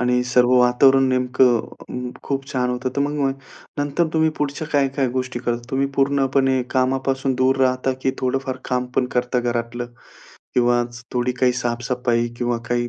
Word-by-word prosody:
आणि 125 0 +2
सर्व 125 0 +3
वातावरण 130 +2 +5
नेमकं 125 -1 +3 0.3
अं, 125 0 -5
खूप 135 -1 -3
छान 125 -1 0
होतं, 125 +1 -2
तर - - +1
मग 145 +1 0
मग 135 -1 +1 0.4
नंतर 145 +4 +1
तुम्ही 160 0 +3
पुढच्या 150 +2 -2
काय-काय 135 -2 +1
गोष्टी 130 0 -3
करता? 120 -1 -2
तुम्ही 135 +1 +1
पूर्णपणे 135 -1 +2
कामापासून 135 +1 0
दूर 130 +1 +3
राहता? 130 0 +2
की 130 - +2
थोडंफार 130 0 -2
काम 125 0 0
पण 125 - +3
करता 125 0 +1
घरातलं? 120 0 -2 0.7
किंवा 120 0 +3 0.3
थोडी 125 0 0
काही 125 -1 +4
साफसफाई 120 0 -1
किंवा 120 -1 -1
काही 120 0 0
130 Hz, 160 wpm, -21 LUFS, 125-135 Hz, 0.7 s, वातावरण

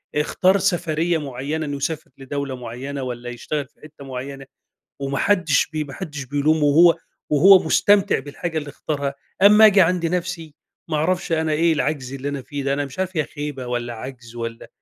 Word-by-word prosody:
اختار 185 +6 +2
سَفرية 175 -3 0
معيَّنة 145 +2 -4
إنه 145 -1 -3
يسافر 155 +2 -4
لدولة 135 0 -4
معيَّنة، 130 +3 -6
والّا 120 -1 -5
يشتغَل 135 +3 -4
في - - -37
حتَّة 150 -2 -12
معيَّنة، 135 +1 -7 0.5
وما 140 0 -2
حدِّش 180 -8 +2
بي 155 -1 -3
ما 140 -2 -10
حدِّش 150 -3 -6
بيلومه، 145 +3 +1
وهو 165 +4 +6 0.3
وهو 185 +6 +7
مستمتِع 200 +5 +3
بالحاجة 155 +4 -5
اللي 150 -2 -4
اختارها. 140 -1 -3 0.3
أمَّا 210 +2 +8
أجي 200 -2 +6
عند 170 0 +2
نفسي، 165 -3 -3 0.3
ما 155 - 0
أعرَفش، 175 +3 0
أنا 160 -1 +1
إيه 165 +2 +3
العجز 145 -4 -2
اللي 135 +1 -4
أنا 140 -1 -4
فيه 140 +2 -6
ده، 140 0 0
أنا 145 0 -1
مش 140 +6 -11
عارِف 185 -2 -2
هي 155 - +3
خيبة 145 -4 -6
والّا 120 -1 -3
عجز 120 0 -9
والّا 115 -1 -6
145 Hz, 180 wpm, -22 LUFS, 135-165 Hz, 0.5 s, أمَّا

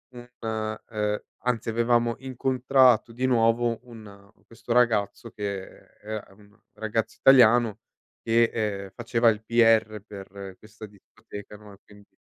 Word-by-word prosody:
un 120 0 -11
,uhm 110 -1 -3 0.3
anzi 115 -2 -1
avevamo 120 +1 +1
incontrato 130 -2 +2
di 125 +3 -2
nuovo 115 -1 +2
un 100 -4 -14 0.2
questo 115 +1 -5
ragazzo 115 -2 +1
che 100 -2 -5 0.3
è 110 -1 -8
un 105 +2 -21 0.2
ragazzo 110 0 -3
italiano 120 -4 +5 0.4
che, 115 +1 +3
ehm, 100 -3 -3
faceva 120 0 +2
il 110 -1 -2
PR 115 -2 +3
per 100 -2 -10
questa 110 0 -12
discoteca, 105 0 -13
no, 105 -1 -15
e - - -16
quindi 105 -1 -19
110 Hz, 130 wpm, -25 LUFS, 105-120 Hz, 0.4 s, italiano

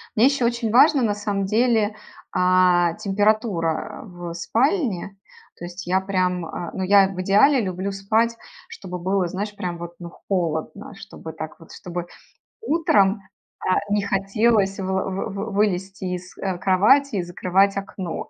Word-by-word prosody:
Мне 225 - +5
ещё 275 -2 +2
очень 235 -2 -1
важно, 280 +4 +6
на 220 -4 +1
самом 205 -1 -2
деле, 220 0 +2 0.4
а, 180 -2 +3
температура, 200 -5 0
а, - - -12
в 175 -3 -8
спальне. 225 - -1 0.4
То 175 - -7
есть, 175 +2 -8
я 185 +1 +2
прям, 185 -2 -1
а, 165 +1 -6
ну, 190 - -3
я 195 0 +5
в 190 -1 -7
идеале 210 +9 +4
люблю 190 -2 -3
спать, 220 +4 0 0.3
чтобы 180 -2 -7
было, 185 +1 0
знаешь, 205 +4 -5
прям 175 -3 -4
вот, 170 0 -8
ну, 170 - -8 0.2
холодно, 175 +2 -2
чтобы 160 -4 -10
так 155 +3 -8
вот. 165 - -14
Чтобы 175 -1 -6 0.6
утром, 215 - +2 0.4
а, 185 - +1
не 205 0 +2
хотелось 200 +1 +1
выла 190 0 -1
вы 190 0 -3
вы - - -5
вы 205 +3 -4
вылезти 195 -1 -1
из, 180 +1 -11
э, 190 -2 -3
кровати 215 +9 +3
и 185 - 0
закрывать 185 +3 +1
окно. 190 -4 -5
195 Hz, 160 wpm, -22 LUFS, 180-215 Hz, 0.6 s, важно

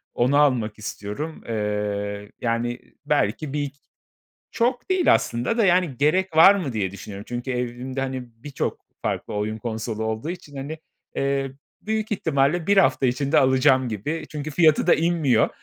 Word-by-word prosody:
Onu 130 +4 +3
almak 120 -7 +2
istiyorum. 110 +9 -6
Eee, 105 -1 -2
yani, 120 +1 -1 0.3
belki 145 0 0
bir 145 -1 -2 0.8
Çok 245 +6 0
değil 370 -2 +4
aslında 120 - 0
da, 220 - +4
yani, 175 -8 +2
gerek 160 +4 +1
var 195 +5 +9
mı 150 -11 -3
diye 100 -4 -1
düşünüyorum. 100 +1 -9
Çünkü 120 +2 -4
evimde 125 +2 -3
hani 130 -1 -3 0.2
birçok 145 -2 -3 0.2
farklı - - -3
oyun 105 +1 -2
konsolu 110 -1 -4
olduğu 110 +7 -3
için, 175 -5 -8
hani, 145 +4 -5 0.4
eee, 135 -1 0 0.3
büyük 220 0 -2
ihtimalle 160 -2 +1
1 200 0 +4
hafta 135 - +4
içinde 140 +4 +1
alacağım 130 -1 +4
gibi. 150 +10 -3
Çünkü 150 0 -5
fiyatı 155 -1 +4
da - - +7
inmiyor. 160 -9 +2
135 Hz, 150 wpm, -24 LUFS, 115-160 Hz, 0.8 s, var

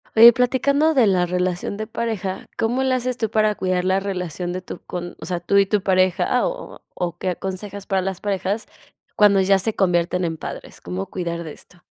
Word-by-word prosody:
Oye, 230 +2 +10
platicando 280 +6 +2
de 260 -6 +4
la 185 -2 +3
relación 180 +2 -2
de 215 - -3
pareja. 210 -6 -3
¿Cómo 240 +4 0
le 260 -1 +1
haces 255 0 -2
tú 220 -3 -1
para 215 -1 +2
cuidar 185 -1 -1
la 190 +1 +2
relación 180 -3 -4
de 185 - -4
tu 180 - -8
con 175 -1 -6
o - - -8
sea, 175 -1 -2
tú 200 +4 +1
y 200 - +6
tu 205 +1 0
pareja, 185 -1 +2
o - - -6
o - - -18
o 175 -1 -3
qué 185 - -2
aconsejas 195 +2 -6
para 195 -2 0
las 190 -1 -4
parejas 200 +1 -2 0.5
cuando 200 -2 +5
ya 195 +1 +4
se 215 +3 -1
convierten 180 -1 +1
en 165 -2 -2
padres? - - -8
¿Cómo 90 +2 -4
cuidar 170 -2 -4
de 155 -2 -7
esto? 180 - -17
190 Hz, 210 wpm, -22 LUFS, 180-215 Hz, 0.5 s, Oye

